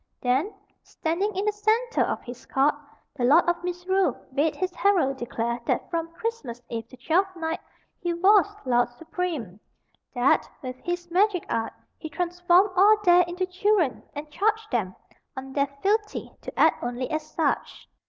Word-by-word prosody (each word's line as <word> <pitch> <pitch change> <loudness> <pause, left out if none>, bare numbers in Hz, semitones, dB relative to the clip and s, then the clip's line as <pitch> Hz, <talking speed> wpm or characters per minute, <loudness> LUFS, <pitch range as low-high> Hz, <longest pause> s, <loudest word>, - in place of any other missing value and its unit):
Then, 265 +11 +1 0.3
standing 370 +6 -2
in 390 +2 -1
the 425 - +3
centre 435 +4 +1
of - - -1
his 245 0 -10
court, 275 +2 +3 0.4
the 255 - -3
Lord 300 +9 +5
of 345 0 0
Misrule 360 +2 0
bade 295 +2 +1
his 365 +4 -2
herald 350 -11 +2
declare 235 -1 -2
that - - -1
from 330 -1 -2
Christmas 330 - -4
Eve 230 -1 -4
to 255 - -15
Twelfth 365 +9 +1
Night 325 -1 -3 0.4
he 350 - -2
was 385 +4 +5 0.2
Lord 245 -1 +2
Supreme; 295 - -5 0.6
that, 250 +2 +3
with 255 0 -6
his 350 0 -4
magic 375 0 +2
art, 225 0 -1 0.3
he 315 - -6
transformed 355 +3 +2
all 410 +3 +6
there 355 -1 +6
into 360 +2 -2
children, 370 -5 +1
and 300 +1 -7
charged 435 +6 0
them, 195 -6 -1 0.4
on 265 0 -7
their 280 0 +2 0.2
fealty 420 +1 0
to - - -8
act - - +4
only 245 +1 -3
as 310 0 0
such. 310 -4 -1
340 Hz, 165 wpm, -26 LUFS, 265-380 Hz, 0.6 s, all